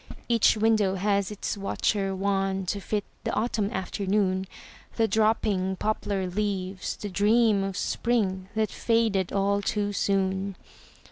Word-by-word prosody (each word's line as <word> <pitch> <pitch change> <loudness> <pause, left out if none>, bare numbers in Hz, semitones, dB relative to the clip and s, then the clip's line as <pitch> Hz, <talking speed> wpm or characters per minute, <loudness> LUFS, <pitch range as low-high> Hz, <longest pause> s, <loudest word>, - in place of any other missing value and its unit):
Each 230 -2 +4
window 215 -3 +3
has 200 0 +1
its 210 -1 -3
watcher 195 0 -1
wan 195 0 0
To 200 +3 -2
fit 205 +1 -2 0.2
the - - -1
autumn 215 -2 0
afternoon, 190 -1 -1 0.5
The 225 -1 +2
dropping 215 -4 +1
poplar 200 -1 -1
leaves, 190 -1 -2
the 210 - -6
dream 205 +1 +3
Of 195 -1 -3
spring 195 -6 0
that 220 -1 0
faded 225 -5 +1
all 200 +1 +1
too 205 0 -1
soon. 195 0 0
200 Hz, 130 wpm, -27 LUFS, 190-215 Hz, 0.5 s, Each